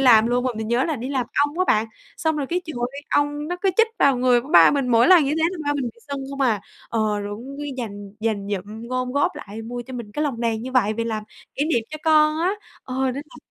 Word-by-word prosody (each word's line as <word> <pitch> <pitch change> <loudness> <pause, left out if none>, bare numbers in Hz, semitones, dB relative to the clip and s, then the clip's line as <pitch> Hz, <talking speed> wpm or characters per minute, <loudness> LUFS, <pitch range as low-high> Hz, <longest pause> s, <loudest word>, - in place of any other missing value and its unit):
làm 230 -4 +6
luôn 245 +1 +1
mà 255 - +1
mình 220 0 -4
nhớ 240 +3 +2
là 315 -4 -1
đi 245 +3 -5
làm 260 -3 -1 0.2
ong 295 +4 -8
á - - +4
bạn, 215 +1 +3 0.3
xong 320 -1 0
rồi 285 -2 -2
cái 355 +4 -1
trời 315 - -7 0.2
ơi, 280 +1 -8
ong 290 +1 0
nó 355 - -2
cứ 385 - +4
chích 455 - +6
vào 275 -2 +4
người 250 -1 +4
của 265 - -12
ba - - +8
mình, 275 -3 0
mỗi 235 +2 +5
lần 355 -5 +7
như 275 - 0
thế 315 +2 0
là 370 - -7
ba 290 0 +1
mình 275 -3 -1
bị 235 -1 -6
sưng 280 -1 -4
không 275 0 -6
à. 220 -6 +2 0.3
Ờ, 215 -2 0
rồi 205 0 -5
cũng 270 +5 -9
cứ 290 - -4
dành 205 -4 -6
dành 210 -3 -1
dụm, 215 +5 -7
gom 255 0 -2
góp 285 +1 +2
lại 215 +2 -8
mua 240 +2 -5
cho 260 - -8
mình 230 -4 -7
cái 300 - -1
lồng 250 -5 -2
đèn 225 -1 0
như 260 - -6
vậy 225 -5 +3
về 230 +1 -2
làm 220 -2 -2 0.3
kỷ 285 - 0
niệm 240 -8 +1
cho 310 - -6
con 310 0 +4
á, 360 +4 +2 0.3
ờ, 255 - -6
nên 255 - -1 0.2
là - - -14
255 Hz, 285 wpm, -23 LUFS, 225-290 Hz, 0.3 s, ba